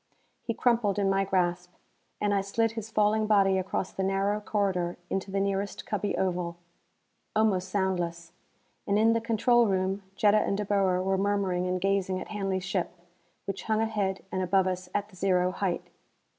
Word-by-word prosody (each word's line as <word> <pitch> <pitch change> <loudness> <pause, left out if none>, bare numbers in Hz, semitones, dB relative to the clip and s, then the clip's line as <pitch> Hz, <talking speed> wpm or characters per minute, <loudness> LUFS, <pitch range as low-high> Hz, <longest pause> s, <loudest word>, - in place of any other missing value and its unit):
He 230 - -3
crumpled 230 -5 +2
in 195 -1 +2
my 195 0 +2
grasp, 180 -2 0 0.5
and 205 -1 +1
I 200 - +2
slid 225 +3 0
his 225 -1 -6
falling 215 0 +2
body 195 -3 +4
across 185 0 -2
the - - -4
narrow 195 +2 +1
corridor 190 -5 -1
into 195 +1 -2
the 195 +1 -1
nearest 195 0 -2
cubby 205 -1 -2
oval. 175 -2 -1 0.8
Almost 195 -4 +2
soundless; 175 -4 -2 0.6
and 200 - +2
in 225 +1 +4
the 230 - 0
control 235 +1 +3
room 190 0 0
Jetta 210 +1 +4
and 200 - 0
De 210 - -2
Boer 190 -2 +2
were 190 0 +1
murmuring 195 -3 0
and 185 0 -1
gazing 190 -1 0
at - - -8
Hanley's 195 -3 -2
ship, 190 -2 -1 0.6
which 195 -1 -5
hung 220 -1 +1
ahead 210 -4 -1
and 185 - -1
above 185 +1 +2
us 185 -1 -3
at 205 0 -1
the 190 - -17
zero 185 -1 +2
height. 185 -1 -2
195 Hz, 175 wpm, -28 LUFS, 185-205 Hz, 0.8 s, body